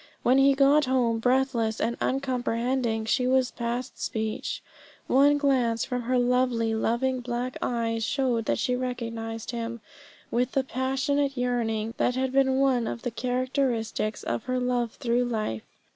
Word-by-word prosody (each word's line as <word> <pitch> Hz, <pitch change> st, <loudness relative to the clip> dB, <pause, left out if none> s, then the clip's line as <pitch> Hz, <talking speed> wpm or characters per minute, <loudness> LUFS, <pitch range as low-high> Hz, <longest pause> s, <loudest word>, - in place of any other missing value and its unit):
When 255 Hz, +2 st, +4 dB
he 275 Hz, 0 st, +5 dB
got 280 Hz, +2 st, +5 dB
home 245 Hz, -3 st, +1 dB
breathless 245 Hz, -2 st, +1 dB
and 235 Hz, -, 0 dB
uncomprehending, 245 Hz, -3 st, 0 dB
she 250 Hz, +3 st, +1 dB
was 260 Hz, -1 st, +2 dB
past 240 Hz, +2 st, -4 dB
speech. 220 Hz, -1 st, -3 dB, 0.4 s
One 285 Hz, +2 st, +4 dB
glance 255 Hz, -5 st, +1 dB
from 250 Hz, -1 st, -2 dB
her 250 Hz, +2 st, 0 dB
lovely 245 Hz, -2 st, +2 dB
loving 240 Hz, +4 st, 0 dB
black 245 Hz, +1 st, -3 dB
eyes 230 Hz, -2 st, -1 dB
showed 250 Hz, -3 st, 0 dB
that -, -, +1 dB
she 250 Hz, -, 0 dB
recognised 230 Hz, -3 st, -4 dB
him 235 Hz, 0 st, -4 dB, 0.5 s
with 250 Hz, +2 st, 0 dB
the 270 Hz, -, +2 dB
passionate 270 Hz, +2 st, -1 dB
yearning 230 Hz, -3 st, -1 dB
that 245 Hz, -, +1 dB
had 260 Hz, 0 st, 0 dB
been 265 Hz, 0 st, +3 dB
one 260 Hz, -4 st, +2 dB
of 235 Hz, -, -5 dB
the 245 Hz, -, -2 dB
characteristics 245 Hz, -3 st, -1 dB
of 120 Hz, 0 st, -3 dB
her 255 Hz, 0 st, -1 dB
love 245 Hz, -2 st, 0 dB
through 245 Hz, -1 st, +1 dB
life. 215 Hz, -, -3 dB
245 Hz, 150 wpm, -27 LUFS, 230-260 Hz, 0.5 s, he